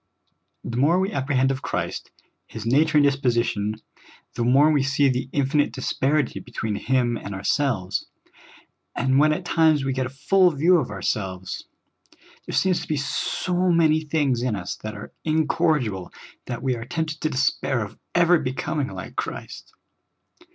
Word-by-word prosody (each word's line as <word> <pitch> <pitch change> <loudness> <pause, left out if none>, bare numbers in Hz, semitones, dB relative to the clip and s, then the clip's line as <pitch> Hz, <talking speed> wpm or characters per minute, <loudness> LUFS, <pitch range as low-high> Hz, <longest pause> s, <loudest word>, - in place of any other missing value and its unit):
The 120 - -4
more 155 +8 +3
we 190 +2 0
ap 135 -7 -2
prehend 135 -1 +3
of 135 0 -4
Christ, - - -3 0.4
His 110 -1 -8
nature 150 +6 +3
and 145 - +5
disposition, 120 -6 +1 0.6
the 120 - -2
more 135 +6 +5
we 145 -2 +3
see 140 +1 +2
the 125 0 -2
infinite 145 +1 +1
disparity 135 +1 0
between 110 -2 -4
Him 120 +2 0
and 100 -1 -7
ourselves; 100 -2 -1 0.9
and 130 +2 +2
when 155 +1 +5
at 175 +4 -2
times 160 -5 +3
we 135 - 0
get 130 0 -1
a - - -8
full 185 +7 +3
view 170 +4 +4
of 145 -7 -1
ourselves, 95 -2 -3 0.8
there - - -3
seems 185 -2 +2
to - - -8
be 155 - -1
so 180 +5 -1
many 160 -2 +4
things 145 -5 0
in 125 -3 0
us 90 -3 -4
that 110 0 -7
are 100 - -9
incorrigible 155 - 0 0.4
that 120 -1 -5
we 130 -2 +1
are 115 - -6
tempted 160 -1 -3
to 155 - 0
despair 135 -3 0
of 100 - -14 0.2
ever 175 0 +5
becoming 145 +1 -2
like - - -8
Christ. - - -6
135 Hz, 165 wpm, -24 LUFS, 120-155 Hz, 0.9 s, and